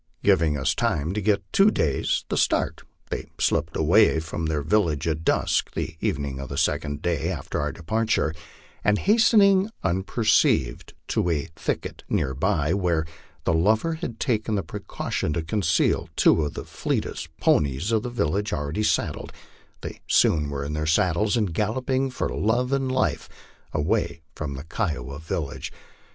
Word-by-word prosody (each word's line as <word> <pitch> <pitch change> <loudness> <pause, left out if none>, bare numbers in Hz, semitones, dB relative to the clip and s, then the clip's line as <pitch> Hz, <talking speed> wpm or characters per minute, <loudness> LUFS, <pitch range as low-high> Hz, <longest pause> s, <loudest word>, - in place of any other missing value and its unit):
Giving 80 -3 +3
us 65 - +1
time 80 +4 0
to 105 - -2
get 105 0 +1
two 195 +2 +6
days 80 - 0
the - - -2
Btart, - - +1 0.3
they - - -4
slipped - - 0
away 80 - +4
from 80 0 -4
their 75 -2 -1
village 80 -3 +1
at 80 0 -1
dusk - - +1
the 80 - -3
evening 70 -2 -2
of 70 - -6
the 70 - -5
second 75 -2 -1
day 85 -1 0
after 80 -8 -3
our - - -1
departure, 110 -2 0 0.5
and 105 0 +3
hastening 205 - +4
unperceived 95 - +1
to 90 - +1
a 80 -1 -1
thicket - - -4
near 65 - 0
by, 80 +1 +1
where 85 -5 +1 0.4
the - - +1
lover 110 - +2
had 120 -8 -6
taken 110 -4 0
the 100 - -1
precaution 75 - -3
to 80 - -2
conceal 80 0 +1
two 80 - +4
of 75 - -5
the - - -6
fleetest 80 - -3
ponies 70 - +1
of 110 -1 +2
the 125 - -4
village 105 -3 -1
already 75 +7 -2
saddled, 110 - 0 0.5
they - - -4
were - - -11
soon 75 -3 +3
in 70 +1 -3
their 75 0 -2
saddles 90 +7 +2
and 105 -7 0
galloping 130 +7 0
for 130 - -2
love 120 +4 0
and 135 -1 0
life 130 0 0 0.4
away 85 0 -1
from 75 -4 -5
the 70 - -7
Kiowa 75 - -3
village. 80 -2 -4
85 Hz, 160 wpm, -25 LUFS, 75-110 Hz, 0.5 s, two